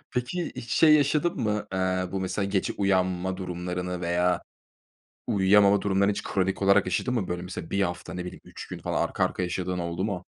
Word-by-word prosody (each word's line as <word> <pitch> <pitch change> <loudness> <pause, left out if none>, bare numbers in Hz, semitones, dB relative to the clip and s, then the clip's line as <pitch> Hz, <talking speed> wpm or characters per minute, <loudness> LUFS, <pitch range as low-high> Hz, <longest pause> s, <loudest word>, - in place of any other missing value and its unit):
Peki 130 +9 -2
hiç 115 - -7
şey 155 -2 +6
yaşadın 150 +4 +2
mı? 105 -2 -1
Aaa, 95 -1 -1
bu 95 - -2
mesela 95 +2 -1
gece 100 -1 0
uyanma 95 -2 0
durumlarını 90 0 -4
veya 90 +1 +1 0.8
uyuyamama 100 +1 +4
durumlarını 100 0 +2
hiç - - -4
kronik 95 0 -1
olarak 100 -1 +4
yaşadın 95 +7 -1
mı, 105 -7 -1
böyle, 90 0 -3
mesela 90 -2 -7
1 100 0 +1
hafta 90 0 -3
ne 90 0 -4
bileyim 90 - -8
3 - - -10
gün - - -6
falan - - -1
arka - - 0
arkaya 90 - -2
yaşadığın 90 +1 -2
oldu 85 +2 -2
mu? 95 -4 -3
95 Hz, 190 wpm, -27 LUFS, 90-100 Hz, 0.8 s, şey